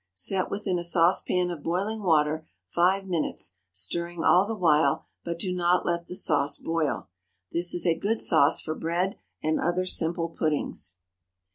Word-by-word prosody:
Set 185 Hz, -, 0 dB
within 195 Hz, -3 st, -1 dB
a -, -, -3 dB
saucepan 175 Hz, +1 st, +2 dB
of 165 Hz, -4 st, -6 dB
boiling 195 Hz, +7 st, -2 dB
water 155 Hz, -3 st, +2 dB, 0.2 s
five 185 Hz, -, +2 dB
minutes, 165 Hz, -, -2 dB, 0.2 s
stirring 170 Hz, -, -2 dB
all 185 Hz, +3 st, +5 dB
the 225 Hz, -, -2 dB
while, 160 Hz, -4 st, +3 dB, 0.2 s
but 170 Hz, 0 st, -4 dB
do 180 Hz, +1 st, -2 dB
not 180 Hz, 0 st, +2 dB
let 170 Hz, 0 st, -1 dB
the 180 Hz, -, -6 dB
sauce 145 Hz, -4 st, +1 dB
boil. 165 Hz, -3 st, -2 dB, 0.4 s
This 175 Hz, +1 st, +2 dB
is 175 Hz, -, -1 dB
a 170 Hz, -, +4 dB
good 220 Hz, +3 st, 0 dB
sauce 155 Hz, -2 st, +4 dB
for 155 Hz, -, -3 dB
bread 170 Hz, +4 st, -2 dB, 0.2 s
and 155 Hz, 0 st, +1 dB
other 175 Hz, +2 st, 0 dB
simple 170 Hz, -1 st, -1 dB
puddings. 150 Hz, -, -2 dB
170 Hz, 160 wpm, -27 LUFS, 160-180 Hz, 0.4 s, all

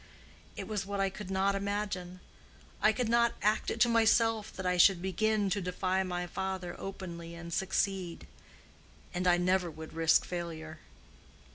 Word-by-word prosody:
It -, -, -6 dB
was 210 Hz, -2 st, -2 dB
what 200 Hz, 0 st, -4 dB
I 195 Hz, 0 st, +1 dB
could 190 Hz, 0 st, -8 dB
not 195 Hz, +1 st, +2 dB
imagine: 195 Hz, -3 st, -3 dB, 0.6 s
I 215 Hz, -, +6 dB
could 240 Hz, +2 st, -1 dB
not 235 Hz, +1 st, +3 dB
act 210 Hz, +1 st, +2 dB
it 230 Hz, -, -3 dB
to 240 Hz, -, +7 dB
myself 225 Hz, -1 st, +3 dB
that 190 Hz, -, -6 dB
I 180 Hz, 0 st, +2 dB
should 180 Hz, +1 st, +6 dB
begin 205 Hz, +3 st, +1 dB
to 200 Hz, 0 st, 0 dB
defy 185 Hz, +1 st, 0 dB
my 180 Hz, -1 st, -2 dB
father 190 Hz, 0 st, -4 dB
openly 170 Hz, -3 st, -7 dB
and 170 Hz, 0 st, -7 dB
succeed. 190 Hz, -1 st, -1 dB, 0.9 s
And 180 Hz, 0 st, -1 dB
I 175 Hz, 0 st, +5 dB
never 180 Hz, 0 st, +2 dB
would 160 Hz, 0 st, -9 dB
risk 165 Hz, 0 st, +3 dB
failure." 160 Hz, -3 st, -6 dB
190 Hz, 160 wpm, -31 LUFS, 175-205 Hz, 0.9 s, to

